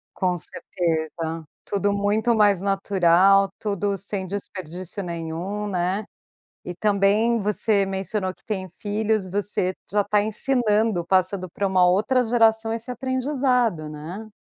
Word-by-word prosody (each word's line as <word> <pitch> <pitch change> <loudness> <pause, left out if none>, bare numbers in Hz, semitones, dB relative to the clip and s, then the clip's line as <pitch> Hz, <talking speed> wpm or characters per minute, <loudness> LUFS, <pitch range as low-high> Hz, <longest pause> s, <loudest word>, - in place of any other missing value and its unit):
Com 180 -2 0
certeza. 165 -1 -3 0.2
Tudo 200 0 0
muito 210 +3 +1
mais 205 -4 +4
natural, 195 0 +4
tudo 200 -1 -1
sem 195 0 -4
desperdício 185 -1 -6
nenhum, 175 +4 -4
né? 185 +2 -1 0.6
E, 180 - -5
também, 210 +4 +2
você 205 0 +1
mencionou 190 0 -2
que - - -24
tem 190 -3 -3
filhos. 210 -1 -1
Você 190 -1 -1 0.2
já 205 0 +2
tá 205 0 +2
ensinando, 215 -4 +1
passando 185 0 +1
pra 200 - -2
uma 185 -2 +3
outra 215 +8 +2
geração 225 -1 +3
esse 230 +2 -5
aprendizado, 255 - 0
né? 165 +9 -8
200 Hz, 125 wpm, -23 LUFS, 185-215 Hz, 0.6 s, mais